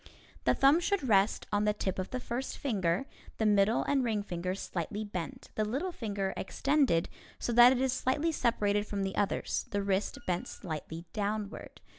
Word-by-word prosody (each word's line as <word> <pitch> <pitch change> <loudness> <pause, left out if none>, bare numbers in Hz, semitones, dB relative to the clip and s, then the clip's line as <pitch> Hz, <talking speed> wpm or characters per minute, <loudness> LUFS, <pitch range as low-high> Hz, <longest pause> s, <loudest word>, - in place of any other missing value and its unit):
The - - +4
thumb 275 +4 +5
should 355 -5 0
rest 200 -2 +3
on 205 0 +2
the 210 0 +2
tip 190 -2 -2
of 185 - -3
the 255 - -3
first 250 +2 -4
finger, 195 -5 0 0.3
the 220 - 0
middle 205 +1 +4
and 275 -2 +1
ring 220 -4 0
fingers 180 0 -3
slightly 190 +5 -3
bent, 180 -7 -6
the 215 - 0
little 270 - -2
finger 205 - -3
extended 275 - +1 0.3
so 240 - -2
that 240 +1 +9
it 260 - +1
is 260 -1 +1
slightly 290 +6 +1
separated 210 -7 +1
from 200 -1 -2
the 195 0 -3
others, 205 -1 -1
the 200 -1 -1
wrist 195 0 0
bent 180 -1 -1
slightly 160 0 -6
downward. 210 -1 -4
210 Hz, 180 wpm, -31 LUFS, 195-255 Hz, 0.3 s, that